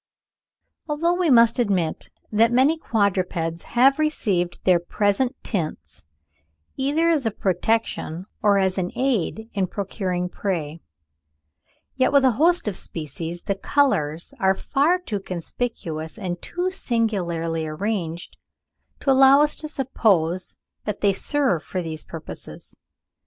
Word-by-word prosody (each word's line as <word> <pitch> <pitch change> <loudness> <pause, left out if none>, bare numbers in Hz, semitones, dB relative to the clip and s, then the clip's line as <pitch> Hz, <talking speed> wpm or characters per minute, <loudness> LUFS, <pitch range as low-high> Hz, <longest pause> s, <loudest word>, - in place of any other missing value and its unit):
] - - -39
Although 330 +4 +1
we 355 -2 +1
must 235 -2 +5
admit 190 -8 0 0.2
that 225 +2 +4
many 265 +6 +4
quadrupeds 185 - -1 0.2
have 270 +4 +5
received 200 - 0
their 180 -2 +4
present 205 +8 0
tints 170 -8 -4 0.7
either 290 +5 +1
as 290 -8 +1
a - - +3
protection, 190 -3 -1 0.2
or 205 -2 +4
as 190 -1 +1
an 180 -1 -2
aid 225 -4 -1
in 195 -2 0
procuring 185 -2 -3
prey, 170 -5 -3 1.1
yet 260 - +2
with 280 -1 +5
a 260 - +5
host 325 +5 +2
of 205 - -1
species, 165 +2 -6
the 200 - 0
colours 175 - 0
are 190 0 +3
far 295 - +2
too 230 - -4
conspicuous 170 -3 -5
and 175 -3 -4
too 360 +1 -2
singularly 175 - -1
arranged 170 0 -4 0.6
to 275 - +2
allow 270 +1 +7
us 295 0 +2
to 305 - -6
suppose 190 - 0 0.3
that 210 -1 -3
they 200 -1 +3
serve 255 - 0
for 185 - -4
these 160 -1 -2
purposes. 160 -2 -8
205 Hz, 130 wpm, -23 LUFS, 175-265 Hz, 1.1 s, allow